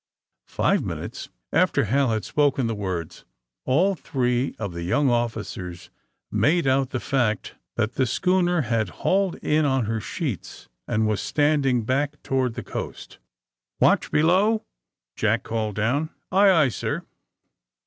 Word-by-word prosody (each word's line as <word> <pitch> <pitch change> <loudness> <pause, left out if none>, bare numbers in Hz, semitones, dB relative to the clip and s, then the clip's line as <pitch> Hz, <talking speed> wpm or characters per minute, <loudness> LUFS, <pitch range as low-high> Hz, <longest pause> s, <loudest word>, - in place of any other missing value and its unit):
' - - -67
' - - -65
Five - - +1
minutes - - -6 0.2
after - - +3
Hal 130 +5 +2
had 110 -4 -1
spoken 145 -3 +1
the 115 - -1
words 95 -6 -4 0.4
all 175 +10 +3
three 125 -6 -1
of 100 -5 -4
the 85 - -5
young 130 +11 +2
officers 110 -7 -3 0.4
made 165 +2 +2
out 135 0 +2
the 130 - -2
fact 120 -7 -1 0.2
that 115 0 0
the 130 - +1
schooner 180 +5 +2
had 115 -5 0 0.2
hauled 195 -1 +2
in 155 +1 +2
on 135 -4 +1
her 110 +1 -2
sheets 135 - -5 0.2
and 110 +1 +1
was 105 -2 0
standing 145 -5 +2
back 140 +5 -1
toward 130 -3 0
the - - -5
coast. - - -7 0.3
'* - - -65
Watch - - +3
below," 190 +8 +3 0.5
Jack - - +1
called 110 -2 -2
down. 130 +9 0 0.2
'Aye, 200 +1 +6
aye, 160 -7 +5
sir." - - -3
130 Hz, 150 wpm, -24 LUFS, 110-150 Hz, 0.5 s, Aye